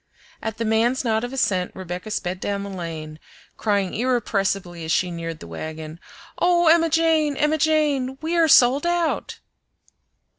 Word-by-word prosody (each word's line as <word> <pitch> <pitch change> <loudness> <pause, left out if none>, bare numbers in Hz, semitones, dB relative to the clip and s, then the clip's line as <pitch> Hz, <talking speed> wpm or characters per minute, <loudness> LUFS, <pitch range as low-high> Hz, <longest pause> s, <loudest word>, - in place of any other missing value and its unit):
At 220 -1 -4
the 230 - -2
man's 225 +4 +1
nod 220 -2 0
of 245 - -4
assent 190 -9 0
Rebecca 180 +2 -6
sped 185 -3 -3
down 200 0 -3
the 200 - -6
lane, 160 -4 -6 0.4
crying 200 -3 0
irrepressibly 195 -7 -1
as 160 - -3
she 180 +1 +1
neared 165 -2 -5
the - - -10
wagon, 155 - -7 0.4
"Oh, 350 -2 +4
Emma 330 0 +5
Jane! 320 -3 +2
Emma 305 +1 +1
Jane! 290 -4 +1
we 320 +2 -2
are 335 -1 +4
sold 270 +2 +5
out!" 345 -2 -1
220 Hz, 155 wpm, -23 LUFS, 180-300 Hz, 0.4 s, Emma